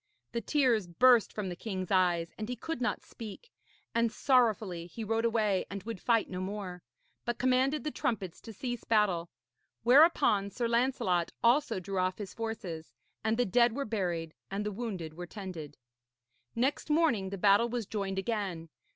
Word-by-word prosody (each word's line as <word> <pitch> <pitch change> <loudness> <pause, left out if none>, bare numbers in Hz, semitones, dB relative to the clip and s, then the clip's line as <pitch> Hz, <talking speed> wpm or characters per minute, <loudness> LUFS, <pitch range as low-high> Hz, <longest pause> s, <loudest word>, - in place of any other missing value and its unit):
The 235 - -2
tears 245 - +2
burst 235 +6 +5
from 205 -3 -4
the 175 - -4
king's 185 -2 -5
eyes 175 -3 +2
and 215 +1 -5
he 250 - -2
could 325 0 -5
not 240 - -1
speak, 230 - -10 0.4
and 230 -1 +2
sorrowfully 215 -9 +2
he 225 +6 -7
rode 225 +2 0
away 215 -4 +2
and 200 -1 -6
would 225 -3 -6
fight 230 -2 +2
no 185 0 -5
more, 185 -2 -5 0.4
but 240 -1 -2
commanded 255 +4 +2
the 305 - -2
trumpets 195 -11 -3
to 225 - -9
cease 245 +2 -4
battle. 190 -6 +2 0.5
Whereupon 250 - +5
Sir 235 +4 -2
Lancelot 230 -8 +1
also 245 -2 +3
drew 190 +1 -3
off 185 0 0
his 205 -3 -7
forces, 195 -8 -5 0.3
and 220 +1 +1
the 245 - +3
dead 235 +4 +4
were 280 0 -2
buried 175 -7 -2 0.2
and 200 +2 -3
the 210 - -1
wounded 195 -7 -5
were 175 +2 -7
tended. 170 -8 -7 0.8
Next 260 +6 0
morning 300 - +2
the 200 - -5
battle 205 +4 +4
was 240 -2 -2
joined 195 -2 -3
again. 195 -6 -2
215 Hz, 170 wpm, -31 LUFS, 185-240 Hz, 0.8 s, burst